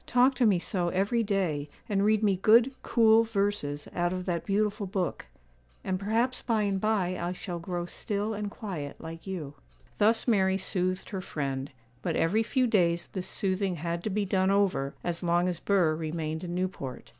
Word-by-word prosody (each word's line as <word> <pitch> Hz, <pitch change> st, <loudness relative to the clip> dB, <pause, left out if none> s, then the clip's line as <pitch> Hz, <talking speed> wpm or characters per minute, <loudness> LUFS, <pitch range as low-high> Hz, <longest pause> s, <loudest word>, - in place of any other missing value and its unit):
'Talk 250 Hz, +2 st, +4 dB
to 245 Hz, -2 st, +3 dB
me 200 Hz, -4 st, +4 dB
so 175 Hz, 0 st, 0 dB
every 200 Hz, +6 st, +1 dB
day, 180 Hz, -9 st, -1 dB, 0.2 s
and 200 Hz, -1 st, +1 dB
read 215 Hz, +1 st, +3 dB
me 200 Hz, -2 st, +4 dB
good, 230 Hz, +7 st, +5 dB
cool 225 Hz, -1 st, +5 dB
verses 200 Hz, -10 st, -1 dB
out 175 Hz, 0 st, 0 dB
of 185 Hz, 0 st, -3 dB
that 170 Hz, -3 st, -2 dB
beautiful 210 Hz, 0 st, 0 dB
book, 185 Hz, -2 st, -2 dB, 0.6 s
and 185 Hz, -1 st, -1 dB
perhaps 230 Hz, +5 st, 0 dB
by 225 Hz, -3 st, +1 dB
and 195 Hz, -2 st, 0 dB
by 195 Hz, -4 st, 0 dB
I 175 Hz, +1 st, -2 dB
shall 180 Hz, -1 st, -5 dB
grow 175 Hz, 0 st, -3 dB
still 205 Hz, +4 st, -3 dB
and 205 Hz, -1 st, -3 dB
quiet 180 Hz, -10 st, -6 dB
like 165 Hz, +3 st, -9 dB
you.' 165 Hz, -7 st, -5 dB, 0.5 s
Thus 225 Hz, +4 st, +3 dB
Mary 190 Hz, -4 st, +3 dB
soothed 185 Hz, 0 st, -2 dB
her 190 Hz, -2 st, -3 dB
friend; 140 Hz, -5 st, -3 dB, 0.3 s
but -, -, -1 dB
every 195 Hz, +7 st, +2 dB
few 255 Hz, +3 st, +1 dB
days 175 Hz, -7 st, +2 dB
this 185 Hz, -2 st, -4 dB
soothing 190 Hz, -1 st, 0 dB
had 170 Hz, +1 st, -3 dB
to -, -, -1 dB
be 205 Hz, +1 st, 0 dB
done 190 Hz, 0 st, +2 dB
over, 195 Hz, -9 st, +1 dB
as 170 Hz, -1 st, -2 dB
long 175 Hz, 0 st, +2 dB
as 175 Hz, -2 st, -2 dB
Burr 180 Hz, -6 st, +2 dB
remained 160 Hz, 0 st, -3 dB
in 175 Hz, -1 st, -4 dB
Newport. 180 Hz, -8 st, -4 dB
190 Hz, 185 wpm, -28 LUFS, 175-210 Hz, 0.6 s, good